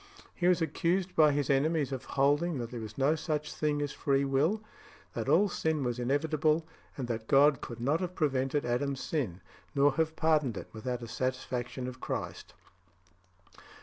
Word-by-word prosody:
He 175 - 0
was 180 -2 +4
accused 180 +3 0
by 155 -2 +6
his 145 -1 0
enemies 145 0 +2
of 130 -1 -4
holding 145 +4 +2
that 120 -2 -5
there 120 - -5
was 110 -1 -8
no 140 +3 +3
such 155 -2 -2
thing 150 -1 0
as 145 - -3
free 140 -1 +1
will; 155 +11 +1 0.5
that - - -3
all 205 - +5
sin 160 -5 -1
was 120 -1 -2
inevitable; 155 +4 +1 0.3
and 130 -3 -3
that 110 -2 -4
God 140 -1 +5
could 120 - -7
not 140 +7 +1
have 180 0 -4
prevented 140 -2 0
Adam's 135 +3 -1
sin, 110 - -2 0.3
nor 140 +1 +5
have 160 0 +1
pardoned 150 -9 +2
it - - -7
without 120 +2 -4
the 120 - -6
satisfaction 130 0 -3
of 125 0 -8
Christ. - - -5
140 Hz, 175 wpm, -30 LUFS, 130-155 Hz, 0.5 s, by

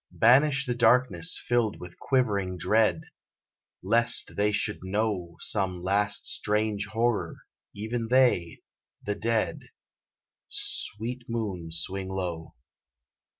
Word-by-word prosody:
Banish 140 +4 +4
the 125 - -1
darkness 125 +7 +3
filled 120 -3 0
with 90 0 -11
quivering 100 -9 0
dread, 110 +5 +2 0.8
Lest 120 +1 +4
they 105 +1 +1
should 105 +1 -2
know 95 -3 -2
Some 95 -4 -1
last 100 +2 +1
strange 105 -1 -1
horror 110 -5 -1 0.4
even 115 +3 -4
they 120 -9 +2 0.4
the 105 - -1
dead 110 +1 -1 0.9
Sweet 120 +4 -3
moon, 105 -8 -4
swing 95 +3 -3
low. 90 -4 -5
105 Hz, 105 wpm, -27 LUFS, 95-120 Hz, 0.9 s, Banish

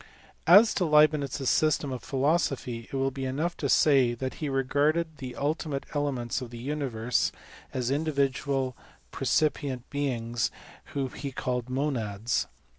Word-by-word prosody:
As 205 +6 +8
to 185 - 0
Leibnitz 150 -2 +4
s 135 - +1
system 155 -3 +2
of 125 -2 -4
philosophy 135 -5 -1
it - - -5
will 135 0 +1
be 135 0 -5
enough 155 +7 -1
to 140 - -2
say 130 -6 +4
that 130 +2 -4
he 150 - -1
regarded 145 +4 +1
the 130 -2 -6
ultimate 145 -1 -2
elements 140 -4 -1
of 125 - -6
the 120 - -9
universe 125 -3 -1 0.4
as 125 -1 -1
individual 140 -3 0 0.4
percipient 140 -5 0
beings 120 -4 -1 0.5
whom 135 -2 -1
he 140 -2 -5
called 125 -1 -3
monads. 120 -5 -1
135 Hz, 140 wpm, -28 LUFS, 125-150 Hz, 0.5 s, As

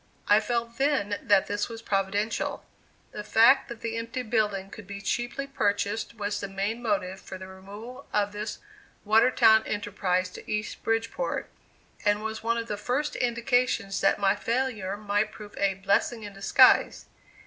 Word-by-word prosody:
I 205 +1 +6
felt 235 +1 -3
then 265 -8 +1
that 200 -3 +4
this 205 +3 -2
was 230 0 -8
providential; 200 +2 -1 0.5
the 210 - -6
fact 230 +5 +5
that 235 -1 -8
the 230 0 -3
empty 230 +3 -4
building 210 -4 0
could 215 -4 -10
be 200 0 -6
cheaply 240 +6 -2
purchased 205 -4 -1
was 205 -1 -2
the 200 - -4
main 200 +4 -3
motive 195 -4 -1
for 190 - -8
the 190 - -9
removal 205 +8 -10
of 205 -1 +1
this 210 +1 -5 0.5
Watertown 220 0 +5
enterprise 190 -3 -1
to - - -9
East 210 0 -3
Bridgeport, 225 - -2 0.5
and 205 0 +2
was 220 0 -4
one 230 +1 0
of 230 0 -3
the 210 - -3
first 255 +8 -1
indications 240 -4 0
that 195 - +3
my 195 0 +2
failure 225 -3 -2
might 205 0 0
prove 210 -1 -11
a 195 -1 +2
"blessing 200 +4 0
in 205 -1 -8
disguise." 195 0 +4
210 Hz, 160 wpm, -27 LUFS, 200-230 Hz, 0.5 s, I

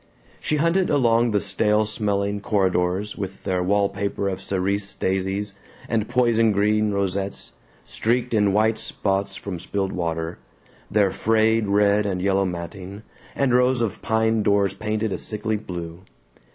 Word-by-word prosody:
She 155 - 0
hunted 170 +4 +2
along 120 -4 +3
the 105 -2 +2
stale 105 +2 +1
smelling 100 -1 -1
corridors 95 0 0
with 95 -2 -6
their 95 -2 0
wallpaper 100 +1 0
of 95 0 -4
cerise 100 +1 -1
daisies 95 +2 -1 0.3
and 110 -1 -1
poison 120 -3 +3
green 105 +1 +2
rosettes, 100 0 -2 0.3
streaked 120 +2 -1
in 105 -2 +3
white 110 +2 +2
spots 95 0 -2
from 95 -4 -6
spilled 95 +2 -2
water, 80 -1 -3 0.5
their 100 -2 +3
frayed 110 +1 +2
red 105 +1 +3
and 95 -2 -2
yellow 95 +1 +2
matting, 90 +3 -6 0.3
and 135 -3 +1
rows 125 0 +3
of 115 -4 -2
pine 110 0 +1
doors 100 -2 +2
painted 110 +1 -2
a - - -3
sickly 110 0 -2
blue. 85 -4 -6
100 Hz, 140 wpm, -23 LUFS, 95-110 Hz, 0.5 s, along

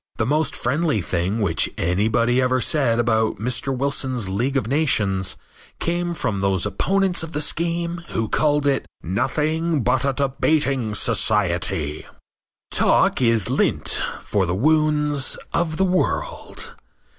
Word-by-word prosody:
The 110 - 0
most 150 +3 0
friendly 140 +1 0
thing 95 +4 -1
which 90 -6 +1
anybody 110 +8 +1
ever 130 0 +2
said 125 -4 +1
about 110 -2 +1
Mr. 125 +4 -2
Wilson's 130 -4 -1
League 120 +9 -1
of 130 - -1
Nations 105 -9 +1 0.4
came 175 0 -1
from 100 - -2
those 95 -1 +1
opponents 190 - 0
of 165 0 -6
the 150 - -1
scheme 170 +2 -1
who 115 -1 -1
called 145 +3 +1
it 140 -2 +1 0.2
"nothing 150 - 0
but 125 +2 +1
a 140 - +2
debating 135 -3 0
society." 90 -9 +1 0.6
Talk - - +2
is 115 -5 +2
lint - - +1 0.2
for 95 -3 0
the 90 - -1
wounds 150 +2 +1 0.2
of 165 -2 0
the 190 - +3
world. 185 - -2
130 Hz, 135 wpm, -22 LUFS, 105-155 Hz, 0.6 s, the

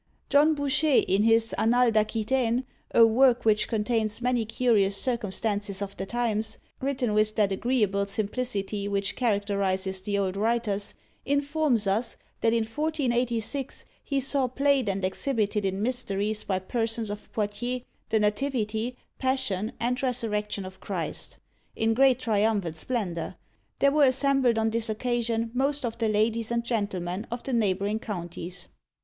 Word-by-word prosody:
John 295 +2 +5
Bouchet, 285 0 +3
in 195 +2 +1
his 225 +1 +3
"Annales 240 +1 +4
d'Aquitaine," 225 +3 +1 0.2
a 230 - +7
work 245 +2 +4
which 215 -1 +3
contains 220 -1 0
many 245 -2 +1
curious 215 -4 +2
circumstances 205 -3 -2
of 200 -1 -5
the 190 - -5
times, 225 -2 -1 0.2
written 260 -4 -1
with 215 0 +2
that 205 -3 +2
agreeable 200 -2 +1
simplicity 205 -1 -2
which 200 -1 -1
characterises 200 -4 0
the 200 +1 -1
old 195 -1 -1
writers, 210 -2 0 0.3
informs 285 -4 +1
us, 215 +5 0 0.2
that 225 - +2
in 230 -1 +2
1486 250 -1 -1 0.2
he 275 -2 0
saw 270 0 +1
played 275 -2 +2
and 195 -1 -1
exhibited 210 -1 0
in 195 +1 -1
Mysteries 215 -4 -1
by 190 - 0
persons 225 +2 -2
of 210 - -8
Poitiers, 240 +4 -2 0.3
"The 220 - +2
Nativity, 220 +1 -1 0.2
Passion, 235 -6 0
and 250 +3 0
Resurrection 210 -6 -1
of 190 0 -10
Christ," - - -5 0.4
in 225 0 +1
great 265 +1 +5
triumph 215 -2 +1
and 165 -1 -4
splendour; 180 -4 -3 0.4
there 280 - +4
were 295 0 +5
assembled 265 -2 +3
on 220 0 +1
this 230 0 -1
occasion 230 0 -1
most 275 +2 +1
of 230 0 -4
the 225 -2 +1
ladies 220 +1 +1
and 235 0 0
gentlemen 200 -4 -2
of 240 +1 -5
the 270 - -3
neighbouring 205 -1 +1
counties. 175 -3 -5
225 Hz, 145 wpm, -27 LUFS, 205-250 Hz, 0.4 s, a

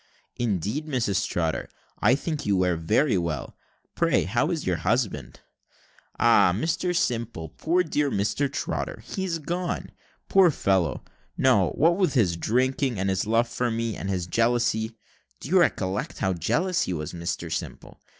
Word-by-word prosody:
"Indeed, 115 - -1
Mrs 115 -9 0
Trotter, 80 -2 -1 0.3
I 120 +5 +4
think 150 +1 -3
you 100 -2 +1
wear 90 -1 +2
very 100 - +2
well. 80 -5 -4 0.4
Pray - - +2
how 120 - 0
is 165 -4 -2
your 90 -2 +1
husband?" 90 - -1 0.8
"Ah, - - +5
Mr 170 - -1
Simple, 115 - -1
poor 175 - +1
dear 150 -3 0
Mr 130 +6 0
Trotter 110 - -4
he's 185 +2 -3
gone. 175 +3 -3 0.4
Poor 190 -2 +6
fellow, 95 - 0 0.3
no - - +4
what 170 +4 +3
with 185 -6 +1
his 95 -9 +3
drinking, 130 - 0
and 95 +1 0
his 95 +2 -1
love 115 +2 +2
for 120 +1 -1
me 115 -1 -2
and 95 - -5
his 90 -3 -1
jealousy 115 +1 0 0.4
(do - - -8
you 185 +2 +5
recollect 100 - 0
how 95 - 0
jealous 170 - 0
he 90 - -1
was, 75 -2 -5
Mr 85 0 -4
Simple?) - - -6
115 Hz, 155 wpm, -25 LUFS, 95-150 Hz, 0.8 s, Poor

